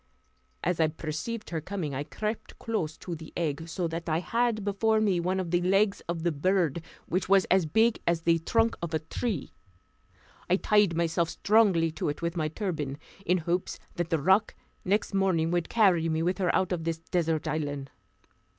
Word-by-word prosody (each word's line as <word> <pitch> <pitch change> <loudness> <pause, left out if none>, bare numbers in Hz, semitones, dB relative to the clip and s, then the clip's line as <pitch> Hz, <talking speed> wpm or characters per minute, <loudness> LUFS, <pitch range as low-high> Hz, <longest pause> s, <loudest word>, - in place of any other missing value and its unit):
As 175 -1 0
I 160 - +5
perceived 165 +9 -5
her 160 -2 -2
coming, 165 -4 -4
I 135 +2 -2
crept 215 +8 -5
close 175 -9 -3
to 175 - -6
the 160 -1 -8
egg, 160 0 -2
so 170 +1 -1
that 165 +1 -4
I 155 - +2
had 230 +3 0
before 215 +2 +2
me 200 -5 +2
one 185 +2 0
of 175 -3 -3
the 175 0 +2
legs 195 +3 +2
of 170 -2 -2
the 170 - +2
bird, 170 0 +1 0.2
which 180 +1 -1
was 195 -1 +5
as 185 -3 +4
big 220 +7 +3
as 170 -1 +2
the 165 0 +3
trunk 225 +7 +2
of 170 -1 -2
a - - +1
tree. 190 - -3 1.0
I 180 - +5
tied 205 -4 +3
myself 170 0 +1
strongly 195 -7 +3
to 155 - -2
it 145 - -4
with 170 +1 -1
my 155 -3 0
turban, 155 -6 -3 0.3
in 180 - +4
hopes 175 +2 -2 0.2
that 170 -1 -2
the 165 - +2
roc 190 +8 +3 0.3
next 205 +2 0
morning 185 -4 +2
would 175 -1 0
carry 185 -7 +3
me 160 0 0
with 180 +3 0
her 180 -2 +1
out 190 -1 +1
of 175 -3 -1
this 165 0 -1
desert 165 -1 -1
island. 145 -3 -3
175 Hz, 195 wpm, -28 LUFS, 160-195 Hz, 1.0 s, I